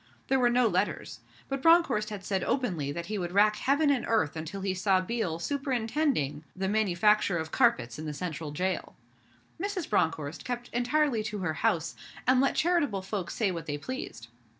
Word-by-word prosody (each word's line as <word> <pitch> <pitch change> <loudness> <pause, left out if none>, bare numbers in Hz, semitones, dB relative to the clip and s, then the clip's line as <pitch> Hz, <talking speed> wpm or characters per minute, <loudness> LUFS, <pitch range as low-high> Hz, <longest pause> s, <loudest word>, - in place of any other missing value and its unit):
There 265 - +3
were 245 -1 +4
no 245 +1 +3
letters; 200 -1 -1 0.3
but 275 -1 -3
Bronckhorst 275 -11 +4
said 190 -1 -1
openly 175 - -1
that 170 +4 -5
he 210 +2 -3
would 175 -1 -4
rack 210 +2 +5
Heaven 285 +2 +2
and 260 -4 +1
Earth 220 -10 +1
until 160 +5 -5
he 190 -1 -1
saw 190 0 +2
Biel 185 -4 -2
superintending 245 - -1
the 190 0 -2
manufacture 210 -1 +2
of 160 -1 -4
carpets 125 - +2
in 155 - -5
the - - -2
Central 160 -2 -4
Jail. 185 +6 -2 0.7
Mrs. 395 -4 -2
Bronckhorst 160 -5 0
kept 245 -1 -5
entirely 245 0 +1
to 210 -1 -3
her 170 -4 -1
house, 155 -2 0 0.3
and 255 +1 +4
let 275 - +2
charitable 300 - +1
folks 190 -2 -4
say 210 -4 +1
what 165 -2 -6
they 145 -1 -2
pleased. 145 - -7
205 Hz, 175 wpm, -29 LUFS, 170-250 Hz, 0.7 s, rack